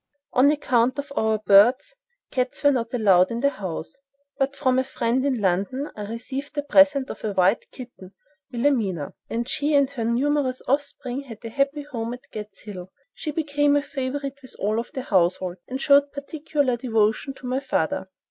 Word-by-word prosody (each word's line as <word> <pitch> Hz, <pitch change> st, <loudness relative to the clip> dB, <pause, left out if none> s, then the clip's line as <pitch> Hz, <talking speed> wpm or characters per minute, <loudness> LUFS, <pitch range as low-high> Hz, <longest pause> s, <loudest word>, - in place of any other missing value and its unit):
On 265 Hz, +2 st, +5 dB
account 255 Hz, -4 st, +2 dB
of 285 Hz, 0 st, -5 dB
our 220 Hz, 0 st, +2 dB
birds, 215 Hz, -, +4 dB, 0.4 s
cats 255 Hz, +2 st, -2 dB
were 285 Hz, -, +6 dB
not 235 Hz, -3 st, -1 dB
allowed 195 Hz, -7 st, +4 dB
in 235 Hz, 0 st, -3 dB
the 280 Hz, 0 st, +3 dB
house; 180 Hz, -, -5 dB, 0.5 s
but 275 Hz, +1 st, 0 dB
from 260 Hz, -2 st, +2 dB
a -, -, +2 dB
friend 255 Hz, -1 st, -1 dB
in 270 Hz, -4 st, 0 dB
London 200 Hz, +9 st, -1 dB
I 210 Hz, -1 st, -6 dB
received 265 Hz, +6 st, -6 dB
a 290 Hz, -, 0 dB
present 285 Hz, -2 st, +4 dB
of -, -, -10 dB
a 215 Hz, -2 st, -2 dB
white 190 Hz, +4 st, +2 dB
kitten—Williamina—and 225 Hz, -, -4 dB
she 295 Hz, +2 st, 0 dB
and 280 Hz, -1 st, +3 dB
her 250 Hz, -5 st, -4 dB
numerous 255 Hz, +2 st, 0 dB
offspring 275 Hz, -1 st, -1 dB
had 245 Hz, -6 st, -10 dB
a -, -, -4 dB
happy 280 Hz, +4 st, 0 dB
home 240 Hz, -4 st, -4 dB
at 250 Hz, -, -19 dB
"Gad's 210 Hz, -1 st, -8 dB
Hill." 190 Hz, -3 st, -9 dB, 0.2 s
She 310 Hz, -, -6 dB
became 290 Hz, -1 st, +1 dB
a 290 Hz, -, +2 dB
favorite 275 Hz, 0 st, -4 dB
with 255 Hz, -, -11 dB
all 215 Hz, +3 st, 0 dB
the 260 Hz, -, -5 dB
household, 185 Hz, -3 st, +1 dB
and 260 Hz, +1 st, -4 dB
showed 280 Hz, 0 st, +4 dB
particular 285 Hz, -2 st, -1 dB
devotion 225 Hz, +2 st, 0 dB
to 255 Hz, -, -12 dB
my 255 Hz, +1 st, 0 dB
father. 190 Hz, -, -1 dB
255 Hz, 175 wpm, -24 LUFS, 215-280 Hz, 0.5 s, were